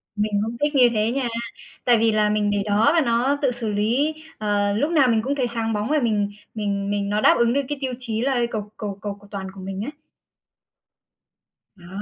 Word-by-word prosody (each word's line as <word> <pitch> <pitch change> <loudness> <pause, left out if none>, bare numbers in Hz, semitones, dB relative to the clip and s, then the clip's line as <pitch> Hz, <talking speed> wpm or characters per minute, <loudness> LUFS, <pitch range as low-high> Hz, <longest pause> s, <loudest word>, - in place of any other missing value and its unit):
Mình 210 0 -1
cũng 230 +1 -5
thích 295 0 +1
như 250 -3 +6
thế 215 +1 +1
nha. 260 -1 -1 0.6
Tại 240 -1 +5
vì 225 0 +3
là 215 -1 +2
mình 210 -1 +1
để 200 -1 0
đó 215 +6 +3
và 330 - +4
nó 250 +3 +1
tự 265 -3 +2
xử 230 -2 -4
lý, 235 +9 +1 0.2
ờ, 205 -1 0
lúc 290 +10 0
nào 295 -6 +4
mình 225 -2 +3
cũng 280 +2 -1
thấy 255 -3 0
sáng 230 -1 -2
bóng 210 +4 -2
và 305 0 +3
mình 205 -3 +1 0.2
mình 200 -2 -2
mình 200 -1 -1
nó 210 +1 0
đáp - - +6
ứng 235 0 +3
được 280 - +2
cái 290 - -2
tiêu 260 -2 -2
chí 225 -2 -3
là 260 -2 +1
cầu 210 -1 -4
cầu 200 -2 -5
cầu 205 -1 -4
cầu 205 - -16
toàn 195 -1 -5
của 195 - -10
mình 195 +1 -5
ấy. 295 - -5 1.8
Đó. 175 -2 -15
220 Hz, 230 wpm, -23 LUFS, 205-250 Hz, 1.8 s, như